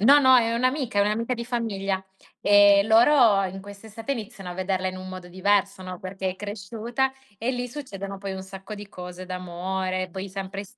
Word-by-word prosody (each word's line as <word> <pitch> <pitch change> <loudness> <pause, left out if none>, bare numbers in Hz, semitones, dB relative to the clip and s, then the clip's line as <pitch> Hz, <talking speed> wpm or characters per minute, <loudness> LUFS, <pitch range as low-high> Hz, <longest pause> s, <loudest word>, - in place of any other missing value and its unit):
no, 275 +8 +8
no, 260 -2 +6
è 230 -2 +3
un'amica, 255 -2 0
è - - +6
un'amica 225 +4 0
di 235 -1 -5
famiglia. 200 -6 -2 0.4
E 205 0 +7
loro 225 -1 +6
in 190 +1 -5
quest'estate 210 +6 -6
iniziano 215 -5 -6
a - - -6
vederla 185 0 -1
in 185 - -6
un 185 0 -8
modo 185 -1 -8
diverso, 200 +1 +1
no, 185 -1 -6
perché 190 0 -3
è 185 - -8
cresciuta, 225 +6 -2 0.3
e 235 +3 0
lì 245 0 -3
succedono 200 -8 -6
poi 195 0 -4
un 190 0 -5
sacco 195 +2 -8
di 205 -1 -9
cose, 180 -1 -8
d'amore, 185 +1 -3
poi 190 +2 -5
sempre 195 +1 -5
200 Hz, 190 wpm, -25 LUFS, 190-230 Hz, 0.4 s, no